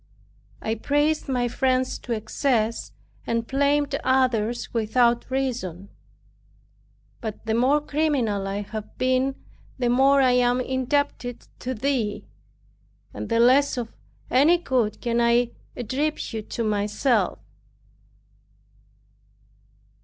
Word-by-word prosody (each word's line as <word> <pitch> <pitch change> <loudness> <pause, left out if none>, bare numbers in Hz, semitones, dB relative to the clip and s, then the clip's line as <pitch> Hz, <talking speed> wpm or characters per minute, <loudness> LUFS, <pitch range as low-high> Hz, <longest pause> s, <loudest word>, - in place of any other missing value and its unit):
I 220 - 0
praised 290 +6 0
my 250 -2 +1
friends 255 +1 0
to 245 - -8
excess, 225 +1 -1 0.4
and 230 0 0
blamed 285 +2 +1
others 245 -3 +1
without 235 +2 +2
reason. 235 -9 -3 1.3
But, 220 -1 -6
the 220 - 0
more 260 +6 +3
criminal 280 -10 0
I 200 +1 -2
have 215 +1 -8
been, 260 +1 +1 0.4
the 245 -2 0
more 270 +3 +5
I 260 -2 +4
am 245 0 +3
indebted 260 -1 -1
to 255 +1 -4
Thee, 235 -3 -1 0.9
and - - -6
the 230 0 +2
less 260 +4 +4
of 235 -2 -4 0.4
any 295 +7 +5
good 250 -10 -1
can 235 -1 0
I 235 0 +3 0.2
attribute 250 -2 -3
to 230 - -2
myself. 210 +4 +1
245 Hz, 110 wpm, -24 LUFS, 225-270 Hz, 1.3 s, more